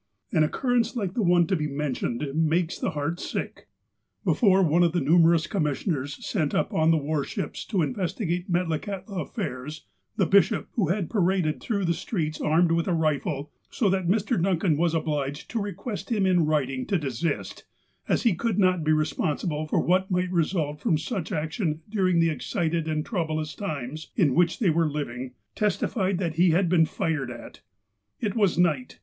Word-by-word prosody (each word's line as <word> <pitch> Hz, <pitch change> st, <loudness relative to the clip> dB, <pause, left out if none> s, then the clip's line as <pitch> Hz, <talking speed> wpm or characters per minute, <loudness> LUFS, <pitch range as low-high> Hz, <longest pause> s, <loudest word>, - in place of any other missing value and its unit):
An 155 Hz, -, +3 dB
occurrence 240 Hz, -, 0 dB
like 195 Hz, -6 st, -2 dB
the 235 Hz, -, 0 dB
one 175 Hz, -2 st, +4 dB
to 190 Hz, -, 0 dB
be 150 Hz, -3 st, -1 dB
mentioned 140 Hz, -2 st, -2 dB
makes 160 Hz, +2 st, +1 dB
the -, -, 0 dB
heart 150 Hz, +3 st, -3 dB
sick: -, -, -5 dB, 0.6 s
Before 195 Hz, -5 st, +4 dB
one 170 Hz, +1 st, +3 dB
of 170 Hz, -2 st, +3 dB
the 175 Hz, -, +2 dB
numerous 165 Hz, +2 st, +4 dB
commissioners, 150 Hz, -, -2 dB
sent 155 Hz, -9 st, -1 dB
up -, -, 0 dB
on 160 Hz, 0 st, +3 dB
the 165 Hz, -, +5 dB
war 150 Hz, 0 st, -1 dB
ships -, -, -5 dB
to 190 Hz, -6 st, 0 dB
investigate 180 Hz, -1 st, -2 dB
Metlakahtla 185 Hz, +3 st, -2 dB
affairs, 150 Hz, -, -5 dB, 0.3 s
the -, -, +3 dB
bishop, 200 Hz, +2 st, +3 dB
who 205 Hz, -8 st, 0 dB
had 185 Hz, 0 st, 0 dB
paraded 185 Hz, -6 st, +1 dB
through 200 Hz, -5 st, -1 dB
the 170 Hz, -, +2 dB
streets 160 Hz, -3 st, -3 dB
armed 165 Hz, +2 st, +3 dB
with 165 Hz, 0 st, +1 dB
a 180 Hz, -, +1 dB
rifle, 150 Hz, -2 st, -1 dB, 0.2 s
so 210 Hz, -, +1 dB
that 190 Hz, -2 st, 0 dB
Mr. 210 Hz, +1 st, +1 dB
Duncan 180 Hz, -2 st, +2 dB
was 165 Hz, +2 st, +1 dB
obliged 145 Hz, -3 st, -2 dB
to 230 Hz, -, -1 dB
request 200 Hz, +2 st, -5 dB
him 205 Hz, -4 st, +2 dB
in 180 Hz, -4 st, +3 dB
writing 135 Hz, -4 st, 0 dB
to 195 Hz, -, +2 dB
desist, 145 Hz, +1 st, -3 dB, 0.4 s
as -, -, +1 dB
he 230 Hz, -5 st, +4 dB
could 220 Hz, +3 st, -1 dB
not 185 Hz, -4 st, +3 dB
be 155 Hz, 0 st, +3 dB
responsible 155 Hz, +1 st, -1 dB
for -, -, +1 dB
what 185 Hz, +2 st, +2 dB
might 180 Hz, -1 st, 0 dB
result 160 Hz, -4 st, 0 dB
from 175 Hz, -6 st, +1 dB
such 185 Hz, +2 st, -4 dB
action 160 Hz, 0 st, -2 dB
during 185 Hz, -5 st, +1 dB
the 165 Hz, -1 st, +3 dB
excited 165 Hz, -1 st, -2 dB
and 155 Hz, 0 st, -1 dB
troublous 155 Hz, -6 st, -2 dB
times 155 Hz, -, -5 dB
in 160 Hz, -, +3 dB
which 175 Hz, +2 st, +2 dB
they 195 Hz, -8 st, +2 dB
were 165 Hz, 0 st, +2 dB
living, 130 Hz, -4 st, -5 dB, 0.2 s
testified 195 Hz, -2 st, 0 dB
that 170 Hz, -4 st, -2 dB
he 180 Hz, +1 st, +5 dB
had 175 Hz, +2 st, +2 dB
been 165 Hz, -2 st, +4 dB
fired 155 Hz, -7 st, -2 dB
at. 120 Hz, -1 st, -10 dB, 0.6 s
It 205 Hz, -3 st, -2 dB
was 200 Hz, -7 st, +2 dB
night. 155 Hz, -8 st, +1 dB
170 Hz, 180 wpm, -26 LUFS, 155-190 Hz, 0.6 s, the